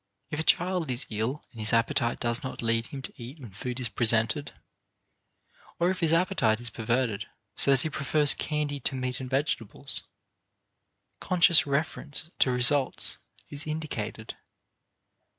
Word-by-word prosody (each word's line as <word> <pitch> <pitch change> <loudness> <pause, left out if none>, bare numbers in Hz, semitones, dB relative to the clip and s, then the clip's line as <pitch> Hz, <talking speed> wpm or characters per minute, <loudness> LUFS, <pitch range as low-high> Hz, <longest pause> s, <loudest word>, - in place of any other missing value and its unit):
If 150 - -3
a - - 0
child 180 -2 +2
is 125 +3 -1
ill 110 +7 -2
and 115 - -13
his 110 +1 +1
appetite 115 0 +1
does 120 +3 0
not 130 -2 -6
lead 115 0 +1
him 135 -2 -8
to - - -7
eat 130 +7 -9
when 120 -7 -10
food 125 +6 -5
is 125 - +2
presented, 115 +4 +1 1.3
or 175 +2 +3
if 190 - -4
his 165 -3 +3
appetite 165 - +2
is 120 -1 -4
perverted 115 -1 -1 0.3
so - - +3
that 135 -2 +4
he 155 - -2
prefers 145 0 +3
candy 150 -2 -3
to 135 - -2
meat 125 -1 -3
and 130 -1 -6
vegetables, 135 -5 -1 1.2
conscious 175 -3 +5
reference 150 +2 -2
to - - +4
results 130 +2 +2 0.3
is 145 +2 -6
indicated. 135 -9 -5
130 Hz, 150 wpm, -27 LUFS, 115-150 Hz, 1.3 s, conscious